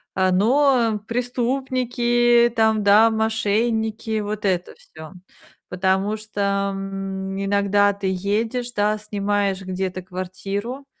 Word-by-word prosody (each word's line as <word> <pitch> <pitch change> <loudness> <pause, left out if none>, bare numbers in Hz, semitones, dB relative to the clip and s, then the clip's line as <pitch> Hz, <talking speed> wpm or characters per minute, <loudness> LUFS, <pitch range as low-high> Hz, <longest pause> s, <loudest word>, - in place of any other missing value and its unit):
а, 185 -1 +2
ну, 235 +2 +3
преступники, 240 -1 +1
там, 220 -1 +3
да, 210 +3 +6
мошенники, 220 0 0
вот 210 0 -4
это 185 -3 -1
всё. 160 +2 -13 0.6
Потому 190 +3 0
что 200 -2 -2
иногда 195 +1 0
ты 200 -1 -4
едешь, 225 +6 -2
да, 210 +1 +1
снимаешь 205 -2 -1
где-то 185 0 -4
квартиру, 195 +8 -5
205 Hz, 100 wpm, -22 LUFS, 195-230 Hz, 0.6 s, да